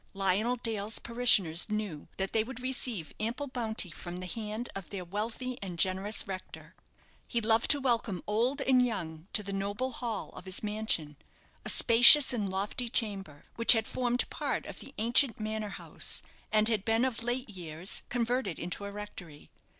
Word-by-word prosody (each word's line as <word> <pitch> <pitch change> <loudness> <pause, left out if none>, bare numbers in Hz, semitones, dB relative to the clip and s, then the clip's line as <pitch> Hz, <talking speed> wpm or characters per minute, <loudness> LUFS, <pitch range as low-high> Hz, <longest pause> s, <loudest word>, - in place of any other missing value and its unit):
Lionel 195 +5 +1
Dale's 220 -3 -3
parishioners 215 -8 +3
knew 210 -8 -4
that 195 0 -3
they 220 - +2
would 250 +1 -8
receive 250 -9 -3
ample 235 +6 -2
bounty 225 -8 -2
from 175 +2 -7
the 185 - -6
hand 215 +4 -5
of 195 -3 -7
their 190 -3 -6
wealthy 225 +7 -4
and 185 -3 -6
generous 190 +5 0
rector. 190 -1 -8 0.5
He 235 - 0
loved 225 0 +2
to 290 - +7
welcome 235 -8 -1
old 240 +7 0
and 255 -2 +4
young 170 -8 -4
to 210 - +2
the 200 0 -6
noble 205 +6 -2
hall 230 -3 -4
of 180 - -12
his 185 +2 -4
mansion, 210 -9 0 0.5
a - - -2
spacious 245 +4 +9
and 210 -5 -1
lofty 205 +6 -2
chamber, 195 -11 -2
which 230 +2 +7
had 225 -1 0
formed 245 0 -1
part - - -3
of - - -8
the 275 - -12
ancient 235 +2 +2
manor 215 0 -3
house, - - -4 0.3
and 215 0 +3
had 220 -4 +1
been 225 +3 +2
of 245 -3 -2
late 245 +1 -2
years 175 -1 -4
converted 240 -5 -1
into 180 +4 -4
a 200 - -6
rectory. 185 -7 -10
215 Hz, 175 wpm, -30 LUFS, 195-240 Hz, 0.5 s, spacious